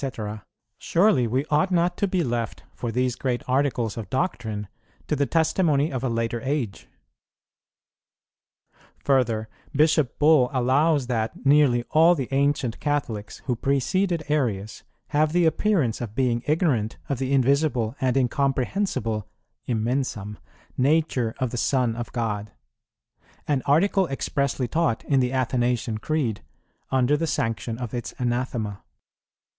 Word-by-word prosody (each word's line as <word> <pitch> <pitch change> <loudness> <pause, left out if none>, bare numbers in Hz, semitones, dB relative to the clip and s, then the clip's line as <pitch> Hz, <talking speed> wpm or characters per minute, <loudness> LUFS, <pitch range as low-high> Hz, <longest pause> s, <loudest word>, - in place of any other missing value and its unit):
_, 110 -6 -5 0.4
surely 165 - +3
we 130 +5 0
ought 155 +5 +3
not 175 -1 +1
to 200 - 0
be 185 -2 0
left 120 -4 -3
for 120 - -4
these 125 +1 0
great 125 -2 -2
articles 125 -5 0
of 110 -5 -6
doctrine 120 - -2 0.4
to 150 - 0
the 140 -1 0
testimony 160 -2 +2
of 130 -2 -3
a 130 - 0
later 115 0 -1
age. 130 -7 -3 2.1
Further, 115 -5 +1 0.3
Bishop 155 -2 +3
Bull 150 -4 +5
allows 140 +3 +2
that 115 0 -3
"nearly 135 -4 +4
all 165 +3 +6
the 135 -6 -3
ancient 135 -4 0
Catholics 120 -8 -3
who 125 - 0
preceded 155 - 0
Arius 110 -9 -1 0.3
have 155 +1 +2
the 175 -1 +3
appearance 160 - +1
of 110 -3 -6
being 125 -3 +1
ignorant 145 - +1
of 140 -3 -2
the 135 0 -2
invisible 135 -3 +2
and 130 0 +1
incomprehensible 130 - 0 0.4
(immensam) 115 -3 -2 0.4
nature 135 -5 +1
of 130 -3 -1
the 120 - -4
Son 125 -2 +1
of 120 -1 -5
God;"[18:2] 105 - -7 0.2
an 140 -3 +2
article 185 +6 +3
expressly 135 -2 -1
taught 160 -4 0
in 140 -2 +2
the 125 -1 +1
Athanasian 125 -3 0
Creed 125 -5 -1 0.5
under 130 +2 +2
the 165 +2 -1
sanction 115 -3 -2
of 120 -3 -6
its 120 -2 -5
anathema. 120 -4 -2
130 Hz, 135 wpm, -24 LUFS, 115-150 Hz, 2.1 s, all